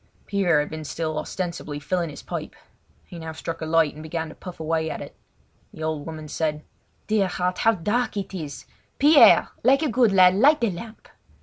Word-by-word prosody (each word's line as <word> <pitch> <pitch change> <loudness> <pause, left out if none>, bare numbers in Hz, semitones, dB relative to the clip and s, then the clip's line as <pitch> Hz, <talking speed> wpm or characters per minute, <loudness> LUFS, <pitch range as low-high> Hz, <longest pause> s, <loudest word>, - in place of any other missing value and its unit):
Pierre 180 -7 +2
had 150 - -5
been 155 0 -6
still 155 0 -3
ostensibly 170 -5 -5
filling 170 +3 -2
his 145 - -10
pipe; - - -6 0.5
he 175 - -10
now 160 0 -6
struck 165 +1 -6
a 160 - -3
light 160 -2 +3
and 155 - -11
began 160 0 -4
to - - -10
puff 180 -2 -10
away 160 0 -1
at - - -5
it. - - -9 0.6
The 155 - -7
old 155 -1 -3
woman 155 -1 -7
said: 150 0 -2 0.4
"Dear 210 -3 +1
heart, 180 0 -2
how 225 - +4
dark 210 +6 -1
it 195 -1 -4
is! 155 -6 -6 0.3
Pierre, 295 +1 +7
like 270 +5 +4
a 305 - +1
good 235 -2 +3
lad, 185 -1 +6
light 280 +10 +5
the 230 -4 +2
lamp!" 215 +6 -10
170 Hz, 200 wpm, -24 LUFS, 155-200 Hz, 0.6 s, Pierre